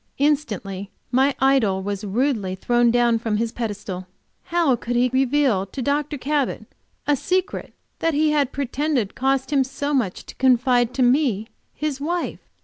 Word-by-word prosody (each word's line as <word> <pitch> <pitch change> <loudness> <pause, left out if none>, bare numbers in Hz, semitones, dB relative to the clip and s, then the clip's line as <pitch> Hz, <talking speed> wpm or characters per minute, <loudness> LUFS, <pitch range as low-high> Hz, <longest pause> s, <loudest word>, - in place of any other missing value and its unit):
Instantly 210 -10 -1 0.2
my 265 +2 +3
idol 235 -9 +3
was 200 +1 -3
rudely 210 -2 0
thrown 240 +4 +2
down 235 -1 +3
from 220 -2 -1
his 230 +1 -1
pedestal. 205 -6 -5 0.4
How 335 -7 +2
could 240 +1 -4
he 245 +1 +3
reveal 260 -6 +2
to 200 - -8
Dr. 290 +3 -1
Cabot 280 +1 -1 0.4
a 295 - +3
secret 370 +7 -1 0.3
he 310 -1 +2
had 285 -3 +1
pretended 275 -3 -1
it - - -37
cost 270 +2 0
him 275 -2 +4
so 285 +2 -3
much 230 -10 -1
to - - -10
confide 250 -1 +3
to 260 - +2
me, 245 -5 +2 0.3
his 295 -3 -3
wife? 345 +3 -2
255 Hz, 155 wpm, -22 LUFS, 225-285 Hz, 0.4 s, him